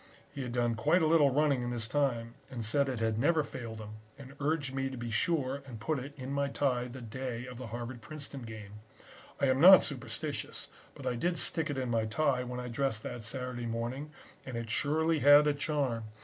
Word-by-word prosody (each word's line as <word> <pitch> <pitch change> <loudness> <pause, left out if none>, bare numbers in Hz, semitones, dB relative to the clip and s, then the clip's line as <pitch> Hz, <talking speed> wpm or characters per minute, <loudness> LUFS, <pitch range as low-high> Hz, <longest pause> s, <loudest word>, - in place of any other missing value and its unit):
He 140 - -5
had 125 -2 -4
done 120 -1 +1
quite 160 +10 +3
a - - +4
little 155 -3 +5
running 140 -1 +2
in 120 - -2
his 120 -2 -2
time 120 -4 0 0.2
and 120 -4 -4
said 140 +5 +2
it 125 -3 -3
had 110 -1 0
never 155 +4 +3
failed 115 -5 -7
him 105 0 -8 0.2
and 135 -1 -11
urged 145 -2 0
me 135 0 -1
to 130 - -7
be 120 -1 -4
sure 140 +1 +1
and 120 -4 -8
put 150 +6 -1
it 140 +3 -8
in 130 0 -6
my 140 0 +1
tie 130 -3 0
the 125 0 -9
day 120 +1 -5
of 125 -1 -9
the 130 - -6
Harvard 120 +2 -6
Princeton 140 +2 -8
game. 105 -3 -9 0.6
I - - +3
am 130 0 +2
not 190 +2 +10
superstitious, 135 -5 -4 0.3
but - - -10
I - - +1
did 170 +8 -1
stick 160 +1 -1
it 145 - -2
in 130 -2 -2
my 115 -1 +1
tie 125 +2 +1
when 125 0 -5
I 125 - -5
dressed 120 -2 -1
that 120 - -6
Saturday 125 +1 -3
morning 120 +6 -3 0.3
and 130 -3 -6
it 115 -1 -4
surely 160 +4 +2
had 145 +1 +8
a 150 - +3
charm. 140 -6 -1
130 Hz, 220 wpm, -31 LUFS, 115-145 Hz, 0.6 s, not